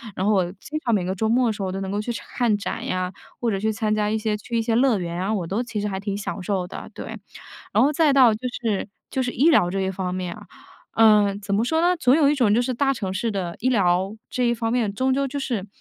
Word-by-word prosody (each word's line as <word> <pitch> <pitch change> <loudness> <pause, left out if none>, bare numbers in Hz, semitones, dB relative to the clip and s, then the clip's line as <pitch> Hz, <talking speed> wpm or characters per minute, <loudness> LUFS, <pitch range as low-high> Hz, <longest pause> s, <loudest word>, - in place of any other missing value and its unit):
然 190 - -1
后 210 - +3
我 190 -3 +3
经 300 +10 -6
常 235 -2 +3
每 190 - 0
个 185 +1 -2
周 220 +3 -1
末 245 +2 +3
的 - - 0
时 205 - -7
候 190 - -1
都 195 +1 -4
能 190 - -4
够 205 - -1
去 240 +3 -3
看 235 -2 -1
展 200 - -4
呀， 185 0 -2 0.3
或 235 -2 +1
者 195 - -1
去 220 +2 0
参 215 0 0
加 210 -1 +1
一 220 - 0
些 215 -1 -1
去 235 +3 -4
一 230 - +2
些 225 0 -1
乐 250 -2 +4
园 170 0 -4
啊， 195 +4 0
我 190 -5 -1
都 200 +8 -1
其 225 -4 -4
实 210 - -1
还 190 -1 -3
挺 200 0 -3
享 200 -1 -5
受 185 0 -1
的， - - -8
对。 - - -7 0.6
然 - - +4
后 290 - +3
再 300 -1 +3
到 255 -5 +6
就 215 - -7 0.2
是 215 -3 -1 0.2
就 265 - 0
是 245 - -1
医 285 +8 +3
疗 180 - +4
这 195 +1 -2
一 190 - 0
方 180 -1 -3
面 180 -2 -4
啊， - - -12 0.5
呃， 210 -3 +5
怎 200 -1 -2
么 215 - +2
说 320 +6 +1
呢？ 360 +1 +3
总 260 -4 +4
有 300 -3 +4
一 - - +2
种 240 -8 +3
就 235 - +3
是 255 0 -2
大 275 +2 +2
城 195 -7 -4
市 225 +4 -1
的 180 -4 -3
医 255 - +1
疗， 190 -3 +2
这 250 - -1
一 - - +3
方 225 0 -2
面 230 -5 +1
终 260 +4 +1
究 275 +1 +1
就 285 +2 -4
是， 235 -8 -3
215 Hz, 310 characters per minute, -23 LUFS, 195-245 Hz, 0.6 s, 到